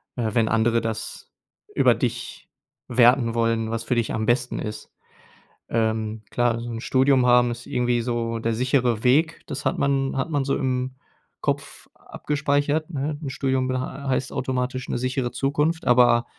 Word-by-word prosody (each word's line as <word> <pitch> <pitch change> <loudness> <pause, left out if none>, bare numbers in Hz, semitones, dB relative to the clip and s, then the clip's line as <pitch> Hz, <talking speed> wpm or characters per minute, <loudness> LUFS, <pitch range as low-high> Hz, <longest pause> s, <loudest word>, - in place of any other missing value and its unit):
äh, 115 -3 -1
wenn 115 -2 +2
andere 115 +1 +2
das 110 -1 -5 0.4
über - - +5
dich - - -4 0.4
werten 120 -1 +4
wollen, 115 -1 +1
was 115 0 -2
für 125 - -1
dich 115 -2 0
am 110 0 -1
besten 120 +1 +1
ist. 105 0 -6 0.8
Ähm, 110 -1 -1
klar, 120 -1 +1
so 120 - -6
'n 115 -1 -4
Studium 130 -1 +3
haben 125 0 +5
ist 120 +1 -7
irgendwie 120 -1 0
so 115 -1 -2
der 115 0 -1
sichere 125 -2 +1
Weg. 155 +6 +3
Das 140 - -6
hat - - +1
man 135 -1 +1
hat 135 +5 -1
man 145 -3 0
so 140 - +1
im 130 -1 -2 0.5
Kopf - - -3
abgespeichert, 150 +2 -1
ne? 145 +1 -2
'N 140 - -4
Studium 130 -1 0
bed 130 0 -1
äh, - - -1
heißt 130 0 -3
automatisch 130 0 -2
'ne - - -1
sichere 130 -1 -1
Zukunft, 150 +4 0
aber 120 -1 +5
125 Hz, 170 wpm, -24 LUFS, 115-135 Hz, 0.8 s, über